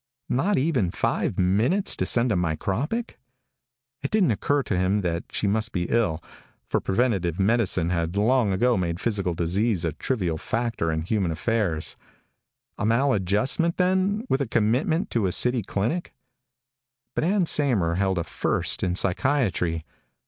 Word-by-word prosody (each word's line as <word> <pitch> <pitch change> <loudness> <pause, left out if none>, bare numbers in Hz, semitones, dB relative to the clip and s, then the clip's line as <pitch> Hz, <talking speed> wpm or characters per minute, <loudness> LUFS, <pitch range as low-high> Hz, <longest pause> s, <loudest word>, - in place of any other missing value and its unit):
Not 175 +12 +1
even 130 - +1
five - - -1
minutes 110 - +2
to - - -1
send 120 0 +3
a - - +2
micropic? 100 - -2 0.8
It - - -3
didn't 200 - +2
occur 140 +6 0
to 100 - -2
him 95 +3 +1
that 85 -2 -2
she - - -2
might 110 +3 0
be 90 -4 -1
ill, 85 -9 0 0.4
for - - 0
preventive 95 -6 0
medicine 95 -5 +1
had 85 +1 -1
long 115 0 +2
ago 120 +6 +2
made 85 -2 -2
physical 100 -6 0
disease 90 +3 0
a 80 - 0
trivial 90 - -2
factor 115 -8 -2
in 80 0 -2
human 95 0 0
affairs. 85 -1 -1 0.8
A - - -2
maladjustment 115 - +2
then, 190 +4 +1
with 135 - 0
commitment 125 - +1
to 110 -5 +1
a - - -1
city 125 +5 +2
clinic? 110 - -3 1.0
But - - -1
Ann 185 +2 +2
Saymer 110 - +2
held 95 -1 0
a 85 - 0
First - - -1
in 90 -1 0
Psychiatry. 90 - 0
105 Hz, 150 wpm, -25 LUFS, 90-130 Hz, 1.0 s, send